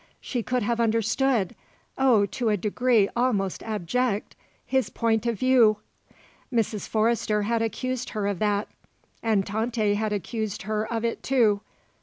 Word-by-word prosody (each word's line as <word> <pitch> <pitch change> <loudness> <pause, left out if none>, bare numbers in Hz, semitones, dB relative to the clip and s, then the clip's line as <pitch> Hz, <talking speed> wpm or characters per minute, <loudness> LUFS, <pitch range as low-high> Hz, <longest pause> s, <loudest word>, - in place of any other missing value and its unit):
She 245 - -3
could 250 +1 -1
have 235 +2 0
understood 225 -1 +1 0.4
oh, 245 -6 +4
to 235 +3 -2
a 210 - +2
degree 215 +2 +2
almost 215 -6 0
abject 215 +2 -2 0.3
his 265 -1 0
point 225 -1 0
of 230 -2 0
view. 240 -3 +4 0.7
Mrs. 225 -3 -1
Forrester 215 -1 +1
had 230 +2 0
accused 255 +3 -2
her 205 - 0
of 200 -2 -1
that. 205 -1 +1 0.5
And 215 -4 +1
Tante 220 0 0
had 215 +1 -1
accused 210 0 -3
her 215 +2 -2
of 230 0 -1
it, 230 - -2
too. 225 -6 +2
220 Hz, 145 wpm, -26 LUFS, 210-240 Hz, 0.7 s, oh